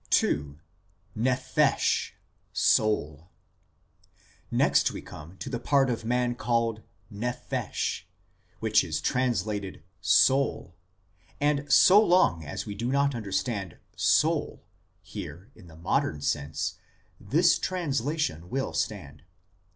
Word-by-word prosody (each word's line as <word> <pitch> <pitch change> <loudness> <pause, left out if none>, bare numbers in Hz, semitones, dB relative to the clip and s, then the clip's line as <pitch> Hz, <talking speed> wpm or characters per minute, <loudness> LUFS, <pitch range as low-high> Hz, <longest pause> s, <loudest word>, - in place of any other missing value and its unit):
II. 75 0 -2 0.3
" 90 +1 -37
NEPHESH," 125 - +1 0.4
SOUL 85 -7 +1 1.2
Next - - +3
we - - -7
come 80 +6 -11
to - - -7
the 125 -2 -3
part 135 0 +2
of 115 - -3
man 120 +1 0
called 115 -1 -1 0.3
nephesh, 120 +4 -3 0.5
which - - +3
is 80 -1 -3
translated 105 - -1
" 90 -1 -42 0.2
soul 135 -9 0 0.3
"; - - -41 0.3
and 145 -1 0
so 205 +4 +7
long 175 - +3
as 75 - -5
we 105 - -5
do 120 +5 -3
not 140 0 +2
understand 100 -3 -3
" - - -38 0.2
soul - - -1 0.2
" - - -43
here 90 - -9
in 90 - -16
the 80 -1 -14
modern 75 -2 -1
sense, 75 +1 -2 0.4
this - - +3
translation 150 - -2
will 135 +4 -2
stand. 80 -9 -4
110 Hz, 120 wpm, -27 LUFS, 85-130 Hz, 1.2 s, so